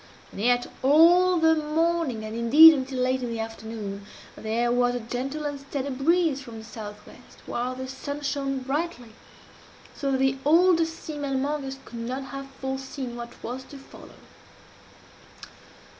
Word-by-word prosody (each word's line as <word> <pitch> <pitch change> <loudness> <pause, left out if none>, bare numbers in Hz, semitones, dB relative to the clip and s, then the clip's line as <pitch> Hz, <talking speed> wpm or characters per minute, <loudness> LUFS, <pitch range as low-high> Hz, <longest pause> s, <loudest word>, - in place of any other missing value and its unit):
And - - -7
yet 245 +2 +3 0.2
all 345 +6 +6
the 320 -1 +5
morning, 310 -5 0
and 215 +1 -6
indeed 290 +8 +9
until 260 -2 -3
late 255 +1 +1
in 245 - -3
the 230 -1 -4
afternoon, 220 -3 -6 0.3
there 235 +2 -1
was 245 0 +2
a - - -1
gentle 260 +6 -4
and 290 -1 -3
steady 275 0 -4
breeze 300 +2 +1
from 235 -4 -10
the 220 - -9
south 210 -2 -9
west, - - -16
while 250 +2 -3
the 260 0 -6
sun 285 +2 -6
shone 275 -1 -2
brightly, 270 -3 -3 0.8
so 275 -1 -2
that - - +2
the 265 0 +1
oldest 330 +1 +3
seamen 290 -3 -3
among 285 +2 -1
us 270 0 -6
could 235 - -9
not 255 +4 -4
have 275 0 -6
forseen 265 -1 -5
what 235 0 -9
was 255 +2 -5
to 280 - -11
follow. 275 - -14
265 Hz, 160 wpm, -26 LUFS, 240-295 Hz, 0.8 s, indeed